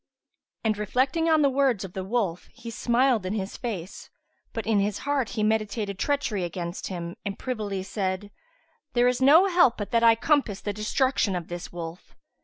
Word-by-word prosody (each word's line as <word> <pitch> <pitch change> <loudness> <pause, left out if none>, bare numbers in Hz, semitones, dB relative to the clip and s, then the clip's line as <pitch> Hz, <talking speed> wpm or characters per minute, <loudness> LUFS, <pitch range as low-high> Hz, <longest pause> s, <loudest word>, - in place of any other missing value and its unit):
'" - - -57
And 215 -1 +1
reflecting 260 - +1
on 315 -2 +4
the - - +5
words 265 -7 +2
of 185 -2 -8
the 190 - -4
wolf 190 -4 -1
he 230 - -8
smiled 240 0 +2
in 185 +2 -2
his 200 -2 -3
face, 200 -7 -6 0.4
but 225 - -4
in 220 -2 +2
his 205 0 0
heart 280 -5 0
he 215 - +1
meditated 215 -2 -1
treachery 260 -9 0
against 175 +1 -4
him 170 -2 -6
and 200 -1 -4
privily 210 -7 -3
said, 190 0 -3 0.6
"There 245 0 +4
is 250 +1 +1
no 305 +8 +7
help 350 -10 +4
but 205 -2 -5
that 230 - +3
I 230 -1 +6
compass 240 -5 +1
the 205 - -3
destruction 215 0 +1
of 175 -2 -5
this 175 0 -6
wolf." 170 0 -8
215 Hz, 190 wpm, -26 LUFS, 190-250 Hz, 0.6 s, no